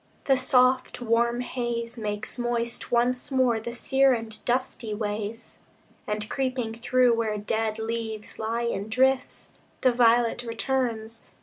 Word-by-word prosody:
The 270 - +4
soft, 255 0 +2
warm 235 0 +1
haze 240 -2 -3
Makes 210 +1 -4
moist 235 -1 -2
once 245 +1 +1
more 255 -4 +2
the 230 +2 -5
sere 265 +2 +3
and 225 -2 -5
dusty 245 -3 -1
ways, 210 +1 -4 0.5
And, 210 0 -2
creeping 255 -4 -2
through 245 +1 +3
where 225 -2 0
dead 220 +1 -1
leaves 220 -1 -4
lie 225 +2 -1
in 215 -3 -2
drifts, 260 +3 +1 0.3
The 255 - +5
violet 240 0 +3
returns. 230 -2 -2
235 Hz, 130 wpm, -26 LUFS, 220-250 Hz, 0.5 s, The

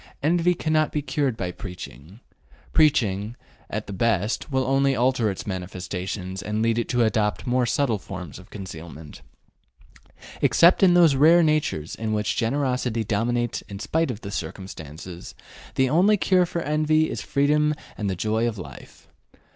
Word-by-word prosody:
Envy 175 +3 +3
cannot 155 -1 +1
be 150 - -2
cured 135 -3 -1
by 90 -2 -3
preaching; 90 - -10 0.5
preaching, 110 -8 +2 0.3
at - - -4
the - - -7
best, 110 - 0
will 130 -1 +1
only 135 +1 +2
alter 125 -2 +2
its 95 - -5
manifestations 95 0 -5
and 105 +2 -2
lead 115 0 +2
it 120 - -3
to 120 -1 +2
adopt 110 -2 0
more 125 0 +1
subtle 115 -4 +1
forms 90 -3 -8
of 95 - -15
concealment. 80 -5 -9 1.2
Except 170 +2 +5
in 180 -2 +6
those 170 -4 +6
rare 160 +5 +6
natures 150 - 0
in 110 -1 -3
which 105 0 0
generosity 125 -2 0
dominates 120 +3 -1
in 100 - -6
spite 160 +10 0
of 120 -3 -5
circumstances, 85 -2 -7 0.4
the 130 - +3
only 185 +9 +4
cure 185 -2 +3
for 170 -1 -3
envy 155 +1 +2
is - - -4
freedom 150 +2 +2 0.2
and 105 -2 -2
the 95 - -1
joy 110 +5 0
of 115 -2 -3
life. 90 - -11
115 Hz, 155 wpm, -24 LUFS, 100-150 Hz, 1.2 s, in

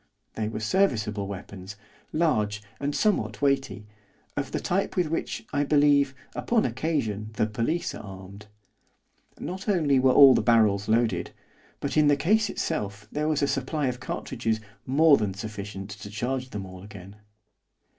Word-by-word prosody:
They 110 -1 -2
were 110 - -4
serviceable 110 - +1
weapons, 100 0 -8 0.4
large, 105 -11 +1 0.2
and 145 +1 -2
somewhat 210 -3 +1
weighty, 135 -8 0 0.5
of - - -3
the - - -1
type 195 +3 -1
with 175 -4 0
which, 140 -7 -3
I 145 - +2
believe, 145 -2 +3 0.2
upon 235 -2 +1
occasion 115 -6 -2
the 110 - +1
police 115 +11 -1
are - - -7
armed. 95 +1 -11 0.9
Not 190 +4 -5
only 155 -9 +3
were 130 0 +4
all 135 0 +9
the - - +2
barrels 105 -3 +3
loaded, 115 +1 +1 0.5
but, - - -2
in 150 -1 +5
the 145 -1 +4
case 205 +9 +2
itself 105 -9 -3
there 150 +1 -1
was 150 -2 +1
a - - +3
supply 140 +2 -1
of 125 0 -5
cartridges 110 -2 -3 0.3
more 145 +2 +6
than 100 -3 -2
sufficient 100 -1 -6
to 105 0 -9
charge 125 +5 -3
them 100 -4 -5
all 95 -1 -10
again. 100 0 -11
120 Hz, 155 wpm, -26 LUFS, 105-150 Hz, 0.9 s, all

